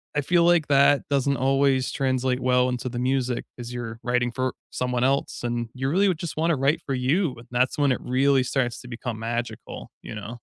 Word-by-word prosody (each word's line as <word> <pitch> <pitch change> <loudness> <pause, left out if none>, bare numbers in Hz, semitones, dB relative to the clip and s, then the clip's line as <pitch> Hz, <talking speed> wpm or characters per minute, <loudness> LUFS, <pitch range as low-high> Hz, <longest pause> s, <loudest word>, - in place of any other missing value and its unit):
I 150 - +2
feel 170 +4 +3
like 170 -3 +4
that 140 0 +4
doesn't 140 -1 +1
always 135 0 +2
translate 130 -2 0
well 125 0 +2
into 125 0 -3
the 120 0 -4
music 130 -1 0
as 120 0 -7
you're 115 -2 -6
writing 120 0 +1
for 130 -1 -1 0.2
someone 125 -1 -1
else, 135 -2 0
and 120 -1 -2
you 130 +1 -2
really 195 +6 +3
would 170 - -1
just 170 -3 -5
wanna 165 0 +2
write 140 +4 +1
for 135 - -2
you 135 +5 +1
and 115 - -13
that's 125 +3 +1
when 140 -2 +3
it - - -4
really 135 +1 +2
starts 125 -2 -1
to 125 - -12
become 120 -1 -5
magical, 120 +1 -5
you - - -7
know? 105 +1 -6
130 Hz, 215 wpm, -25 LUFS, 120-140 Hz, 0.2 s, like